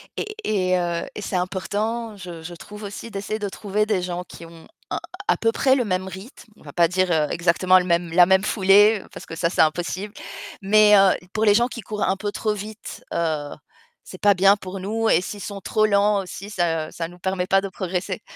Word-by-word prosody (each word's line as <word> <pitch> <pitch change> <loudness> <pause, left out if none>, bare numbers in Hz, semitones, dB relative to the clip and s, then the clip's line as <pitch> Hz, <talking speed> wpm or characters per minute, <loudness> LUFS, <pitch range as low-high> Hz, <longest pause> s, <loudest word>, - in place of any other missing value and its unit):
et 425 0 -5
et 185 -3 +1
heu, 170 -1 -2
et 210 - -5
c'est 195 - -4
important, 205 +5 -2
je 175 -3 -9
je 175 +2 -7
trouve 210 +5 -11
aussi 205 +3 -7
d'essayer 210 +1 -4
de 205 -1 -3
trouver 210 +1 -1
des 205 -4 0
gens 180 0 -4
qui 170 -1 -12
ont 165 -1 -14 0.2
un - - -1 0.3
à - - +3
peu 225 0 +1
près 265 +3 +3
le 250 - +1
même 185 -1 -1
rythme. 215 +4 -11
On - - -23
va 145 - -10
pas 170 -1 +4
dire, 185 0 0
heu, 155 -2 +2
exactement 180 +2 +3
le 180 - -3
même 170 -1 0
la 175 0 +7
même 190 +1 +4
foulée 205 +1 +4
parce - - -10
que, 165 - -8
ça, 170 0 0
c'est - - +2
impossible 175 +6 -1 0.5
mais 210 +1 +6
heu, 195 -1 +6 0.2
pour 220 0 +1
les 205 - +6
gens 240 +2 +3
qui 240 -2 -8
courent 210 0 -4
un - - +1
peu 205 0 -3
trop 215 0 -1
vite, 210 +1 -8
heu, 155 -3 -1 0.5
c'est 185 - -12
pas 205 -1 +6
bien 195 +2 +5
pour 190 -1 -8
nous 220 +4 -1
et 165 - +5
s'ils 205 +2 -7
sont 200 -2 -6
trop 215 +3 +1
lents 200 -1 +3
aussi, 195 +2 -8
ça 165 -5 -1
ça 165 -1 -4
nous 175 +1 -15
permet 185 0 -2
pas 195 0 +3
de 195 - -5
progresser, 185 0 -4
190 Hz, 230 wpm, -23 LUFS, 180-210 Hz, 0.5 s, la